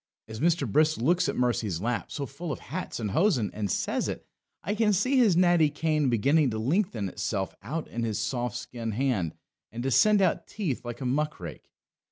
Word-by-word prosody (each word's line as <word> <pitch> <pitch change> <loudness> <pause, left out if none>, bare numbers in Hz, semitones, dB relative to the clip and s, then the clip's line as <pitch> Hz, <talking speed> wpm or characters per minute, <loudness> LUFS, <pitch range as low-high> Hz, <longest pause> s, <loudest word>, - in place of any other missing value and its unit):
As 110 0 -7
Mr. 165 -3 +2
Brisk 155 +7 +3
looks 170 +10 +2
at - - -2
Mercy's 115 -8 0
lap 115 +4 -2
so 140 - -3
full 155 +5 -6
of - - -3
hats 180 -3 -5
and 105 -3 -2
hosen 160 - +2
and 105 -2 -3
says - - -1
it, - - -5 0.4
I 205 - -1
can 215 -1 +2
see 255 +8 +2
his 215 -9 +5
natty 175 -4 +5
cane 150 -1 0
beginning 140 +6 +3
to 110 - -3
lengthen 145 - 0
itself 95 +1 -3
out 150 +10 -4
in 120 - -5
his 110 -3 -1
soft 120 +2 -2
skinned 115 -3 -5
hand 115 - 0 0.4
and 120 +2 -5
to 135 - 0
send 215 - +5
out 185 -3 +1
teeth 170 - -3
like 120 +1 -7
a - - -3
muck 150 +4 -1
rake. 85 -3 -9
135 Hz, 205 wpm, -27 LUFS, 115-170 Hz, 0.4 s, his